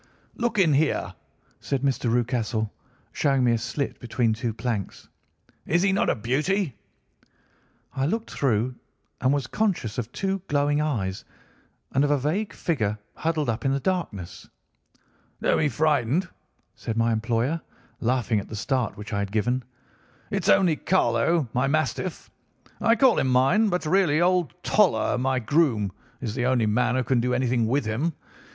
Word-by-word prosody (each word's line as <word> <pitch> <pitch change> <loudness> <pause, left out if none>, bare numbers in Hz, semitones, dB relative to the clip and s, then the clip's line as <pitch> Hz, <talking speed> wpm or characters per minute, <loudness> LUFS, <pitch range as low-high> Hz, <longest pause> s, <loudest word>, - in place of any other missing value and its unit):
"'Look 235 -1 -2
in 175 -6 +4
here!' 150 +2 +1 0.5
said 140 -2 -2
Mr. 130 -4 +1
Rucastle, 115 -3 0 0.4
showing 135 -3 +1
me 120 - +4
a 115 - +2
slit 130 +5 -3
between 120 -1 0
two 115 +1 -2
planks. 110 -3 -4 0.6
'Is 175 +3 +2
he 195 - +3
not 195 - +2
a - - +2
beauty?' 145 - 0 1.2
"I 135 +1 0
looked 225 +6 -2
through 125 -2 0 0.5
and 130 - +3
was 140 -3 0
conscious 175 - -1
of 120 0 -5
two 195 +3 -2
glowing 145 +1 +1
eyes, 105 -11 -2 0.7
and 135 - +2
of 145 - +2
a 145 - +3
vague 165 +10 -1
figure 110 -11 -1 0.2
huddled 160 -2 -1
up 115 -1 -2
in 135 - +2
the 140 - 0
darkness. 135 - -3 0.9
"'Don't - - +2
be 150 - +2
frightened,' 150 +3 +1 0.5
said 115 - -5
my 115 0 +2
employer, 115 +8 0 0.4
laughing 120 -2 +1
at 100 - -8
the 110 - -6
start 125 +2 -1
which 105 +1 -7
I 100 - 0
had 100 -1 -3
given. 120 +4 0 0.7
'It's - - 0
only 155 - +4
Carlo, 170 -4 +2
my 125 +2 +1
mastiff. 155 +4 -2 0.5
I 230 0 +4
call 260 -1 +4
him - - +1
mine, 135 - +3
but 180 -2 -1
really 165 -2 +3
old 180 -3 +2
Toller, 200 -10 +2
my 130 +1 +1
groom, 120 - +1 0.3
is 115 -5 -3
the 125 0 0
only 125 -3 +2
man 125 +4 +1
who 130 - +1
can 125 +1 +1
do 125 +1 0
anything 125 -2 +1
with 130 +2 +1
him. 130 +10 -1
130 Hz, 160 wpm, -25 LUFS, 115-160 Hz, 1.2 s, in